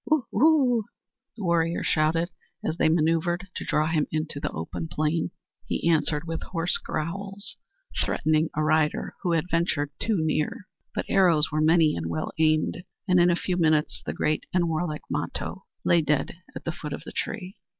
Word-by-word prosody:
"Woo! 310 -5 +2
woo!" 255 -4 +4 0.5
the 215 - -6
warriors 170 -1 +1
shouted, 165 +3 +2 0.3
as 160 - -1
they 160 - +4
maneuvered 165 +3 +1
to - - -4
draw 150 - +1
him 155 -2 +1
into 155 -2 -2
the - - -2
open 80 - -5
plain. 155 +1 0 0.4
He - - -1
answered 155 -2 +3
with 165 -1 -3
hoarse 175 0 -1
growls, 195 +6 -4 0.5
threatening 155 +1 +1
a 155 - +1
rider 155 0 +1
who 175 -3 +1
had 165 +2 0
ventured 155 -4 +1
too 220 -3 +1
near. 155 +4 -1 0.3
But - - -1
arrows 170 -6 +4
were 155 +1 +1
many 160 0 +4
and 80 -1 -3
well 80 -1 -2
aimed, 155 +2 +2 0.2
and 180 -1 +5
in 175 +1 +6
a 175 - +4
few 180 +1 -1
minutes 155 -3 +2
the - - -3
great 155 0 0
and 175 -2 +2
warlike 155 -1 -2
Mato - - -3 0.2
lay 170 -1 +5
dead 150 +2 0 0.2
at - - -6
the 170 - -2
foot 150 -3 -6
of - - -6
the - - -8
tree. 195 -3 -4
165 Hz, 180 wpm, -26 LUFS, 155-175 Hz, 0.5 s, in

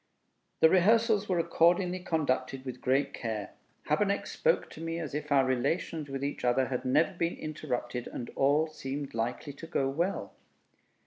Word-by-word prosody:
The 160 - +8
rehearsals 210 +2 +4
were 180 - +2
accordingly 175 +2 +3
conducted 135 -6 -1
with 125 -1 -6
great 135 +2 +1
care. 110 -3 -4 0.3
Habeneck - - +1
spoke - - +1
to 155 - -10
me 165 0 -3
as 160 -5 -5
if 150 0 -4
our 135 -2 +5
relations 145 +4 -1
with 135 0 -4
each 140 - -3
other 125 +1 +2
had 125 0 -3
never 150 +7 +3
been 170 -1 -1
interrupted, 125 -5 -4
and 120 - -6
all 145 +3 +3
seemed 140 -2 -6
likely 115 +5 -3
to 165 +4 -10
go 140 -5 0
well. 170 +8 -2
145 Hz, 165 wpm, -30 LUFS, 130-170 Hz, 0.3 s, The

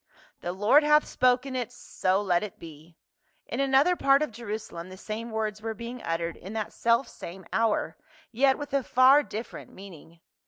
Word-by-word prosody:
"The 175 - -4
Lord 210 +10 +4
hath 300 0 +4
spoken 255 +1 +1
it, 245 -4 -3
so 190 +2 -1
let 180 -3 +2
it 210 -3 -7
be 160 +1 -13 0.3
!" - - -43
In - - -2
another 275 +6 +3
part 275 -2 +4
of 300 - -4
Jerusalem 210 -6 -7
the 185 - -10
same 220 +4 -6
words 215 -1 -3
were 225 0 -4
being 235 +3 -7
uttered 165 0 -3
in 195 +4 -9
that 220 -1 -4
selfsame 230 -6 -1
hour, 220 -7 0 0.3
yet 265 +3 +3
with 290 -1 -7
a 275 - +2
far 260 +2 +5
dif 225 -5 -6
ferent - - -10
meaning. 170 -4 -13
220 Hz, 185 wpm, -27 LUFS, 190-260 Hz, 0.3 s, far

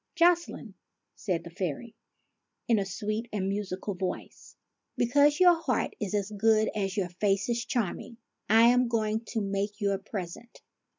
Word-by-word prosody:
"Jocelyne," 340 - +2 0.4
said 180 -5 -2
the 170 - -10
fairy, 185 - -4 0.7
in 230 -3 +3
a 195 - -2
sweet 215 +4 -3
and 195 -2 -2
musical 200 0 -3
voice, 185 0 -6 0.2
" - - -52
because 285 +5 +3
your 350 -2 +6
heart 260 -8 -1
is 210 -1 -2
as 205 0 -1
good 215 +1 +2
as 195 -1 -2
your 185 -3 0
face 195 +3 0
is 235 -1 0
charming, 230 0 -3 0.3
I 225 +2 +6
am 250 0 +3
going 220 -2 0
to 225 0 -3
make 200 +1 -2
you 200 -2 +1
a 195 - -1
present. 195 +3 -8
210 Hz, 165 wpm, -28 LUFS, 195-235 Hz, 0.7 s, your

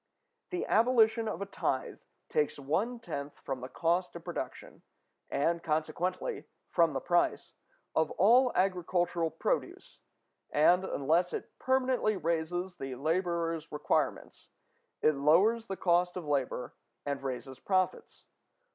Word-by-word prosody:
The 360 - -2
abolition 225 -1 +3
of 200 -3 -3
a - - -5
tithe 200 - -2 0.3
takes 460 -1 0
one 185 - -1
tenth 145 -8 -6
from 135 -2 -5
the 130 - -6
cost 175 +4 0
of - - -8
production, - - -6 0.5
and 170 +4 +1
consequently 170 - -2 0.3
from 165 -3 +3
the 135 - -1
price, 175 +4 0 0.4
of 160 -1 +2
all 245 +6 +5
agricultural 175 -2 +1
produce; 160 - -3 0.5
and, 175 +5 +4
unless 170 +1 +1
it - - -5
permanently 255 -5 +1
raises 175 +2 -2
the 135 -1 -5
laborer's 165 +2 -1
requirements, 150 0 -1 0.5
it 155 - +5
lowers 185 +11 +3
the 195 - -4
cost 180 0 +2
of 175 - -5
labor 135 -4 -1 0.3
and 140 -1 -2
raises 130 0 -5
profits. 185 -2 -1
175 Hz, 125 wpm, -31 LUFS, 155-195 Hz, 0.5 s, all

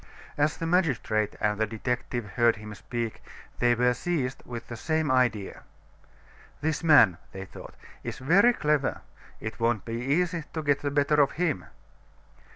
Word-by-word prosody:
As 150 +1 +1
the 165 - -3
magistrate 135 - +1
and 105 0 0
the 110 - +1
detective 120 0 -3
heard 115 +5 +3
him 105 0 -9
speak, 115 +2 -5 0.4
they 120 0 +4
were 125 +1 +3
seized 135 -3 -2
with 120 -1 -7
the 120 - -6
same 155 +3 0
idea. 120 -6 +1 1.0
"This 155 +1 -1
man," 140 - +6
they 95 0 -6
thought, - - -12 0.3
"is - - -5
very 180 - +5
clever; 150 - 0 0.4
it 110 +2 -6
won't 115 -3 +1
be 115 +1 -4
easy 165 +5 0
to 160 - -3
get 145 -1 +1
the 145 - -1
better 145 +1 +3
of 140 - +2
him." 160 - -1
125 Hz, 160 wpm, -27 LUFS, 115-150 Hz, 1.0 s, man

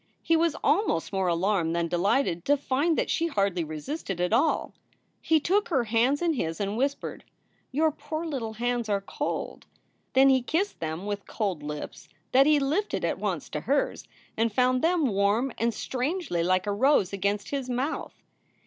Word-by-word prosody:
He 330 - +3
was 330 -1 +2
almost 310 - +1
more 190 -1 +1
alarmed 170 -1 +1
than 170 -1 0
delighted 175 +1 +1
to 290 +1 +4
find 285 +4 0
that - - 0
she 335 - +1
hardly 200 - 0
resisted 175 - -5
at 180 +4 0
all. 315 - +2 0.5
He 320 -1 +3
took 390 +7 +1
her 270 -8 +2
hands 240 +7 +2
in 335 -2 +2
his 165 - -3
and 200 0 -2
whispered, 275 +4 -2 0.5
"Your 310 +4 +2
poor 310 +2 -5
little 255 -8 -3
hands 240 0 -1
are 200 -1 +2
cold!" 195 - -4 0.5
Then 270 +1 +6
he 260 -1 +4
kissed 340 +11 -1
them 160 +3 -4
with 205 -1 -4
cold 195 -8 -2
lips 150 0 -7 0.2
that 270 +2 +6
he 305 -1 +5
lifted 310 +10 0
at - - -1
once - - -2
to - - -3
hers - - -1 0.3
and 225 0 +1
found 255 +3 +2
them 335 -2 +2
warm 210 +3 +1
and 235 +1 +2
strangely 260 - -2
like 185 +2 +2
a 205 - -1
rose 210 -4 +3
against 200 +1 -1
his 275 -3 -3
mouth. 255 +5 -3
245 Hz, 175 wpm, -27 LUFS, 195-290 Hz, 0.5 s, Then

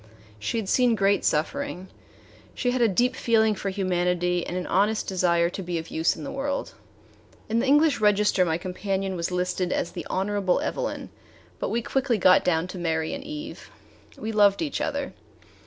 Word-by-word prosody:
She 105 - -2
had 220 -4 -2
seen 245 +2 +3
great 200 0 +2
suffering; 190 - -1 0.7
she 245 - 0
had 250 0 -1
a 235 - +5
deep 245 +6 +1
feeling 220 -3 +3
for 200 -1 -4
humanity 180 -2 0
and 180 - -3
an 180 - -3
honest 210 +4 +1
desire 175 -2 +2
to 195 - -5
be 175 -2 -3
of 160 0 -6
use 160 +1 +1
in 155 - -8
the - - -5
world. 275 +1 -3 0.7
In 225 +1 +1
the 260 - 0
English 295 -2 +4
register 210 -2 +3
my 165 -2 0
companion 190 +1 -3
was 170 -1 -2
listed 180 0 -1
as - - -1
the 170 -4 -7
Honorable 195 -1 0
Evelyn, - - -3 0.5
but - - -2
we 235 0 -1
quickly 260 -2 0
got 185 -1 +5
down 165 -2 +1
to 185 - -7
Mary 160 -2 -1
and 280 -1 -5
Eve. 300 +1 -8 0.5
We 220 - -4
loved 205 +2 +4
each 295 - -3
other. 285 -2 -2
195 Hz, 185 wpm, -25 LUFS, 180-235 Hz, 0.7 s, a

